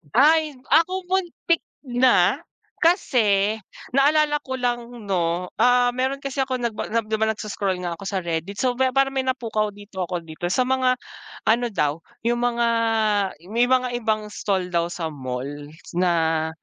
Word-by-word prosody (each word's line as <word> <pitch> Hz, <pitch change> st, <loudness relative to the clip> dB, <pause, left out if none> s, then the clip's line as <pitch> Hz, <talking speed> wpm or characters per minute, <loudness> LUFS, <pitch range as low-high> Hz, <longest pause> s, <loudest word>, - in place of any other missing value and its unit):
Ay, 305 Hz, +2 st, +4 dB, 0.2 s
ako 365 Hz, +5 st, +3 dB
muntik 350 Hz, -2 st, 0 dB, 0.2 s
na 250 Hz, 0 st, +3 dB, 0.4 s
kasi 220 Hz, -, +3 dB, 0.3 s
naalala 295 Hz, +3 st, +3 dB
ko 260 Hz, -, -4 dB
lang 245 Hz, -2 st, -1 dB, 0.2 s
‘no, 175 Hz, 0 st, 0 dB
ah, 245 Hz, 0 st, +4 dB
meron 260 Hz, +3 st, -2 dB
kasi 275 Hz, 0 st, -5 dB
ako 255 Hz, -2 st, -3 dB
nagba 230 Hz, -3 st, -2 dB
‘di 220 Hz, -1 st, 0 dB
ba 220 Hz, -, +2 dB
nagso-scroll 205 Hz, -4 st, -2 dB
nga 170 Hz, -2 st, -3 dB
ako 195 Hz, -, -10 dB
sa 195 Hz, -1 st, -1 dB
Reddit. 170 Hz, +2 st, -3 dB
So 250 Hz, -2 st, +1 dB
ba 260 Hz, -1 st, +2 dB
parang 270 Hz, 0 st, +2 dB
may 260 Hz, -, 0 dB
napukaw 225 Hz, -5 st, -1 dB
dito 200 Hz, -3 st, -6 dB
ako 175 Hz, -1 st, -3 dB
dito 160 Hz, +1 st, -7 dB
sa 185 Hz, +8 st, +1 dB
mga 255 Hz, 0 st, +2 dB, 0.5 s
ano 235 Hz, +2 st, +3 dB
daw, 150 Hz, -6 st, -1 dB, 0.2 s
yung 240 Hz, 0 st, +1 dB
mga 240 Hz, -1 st, +1 dB, 0.9 s
may 240 Hz, +2 st, +3 dB
mga 255 Hz, -1 st, +2 dB
ibang 215 Hz, -2 st, -1 dB
stall 185 Hz, -3 st, -2 dB
daw 170 Hz, 0 st, +1 dB
sa 170 Hz, -2 st, -4 dB
mall 130 Hz, -2 st, -4 dB, 0.5 s
na, 165 Hz, -3 st, +1 dB
230 Hz, 155 wpm, -23 LUFS, 180-260 Hz, 0.9 s, Ay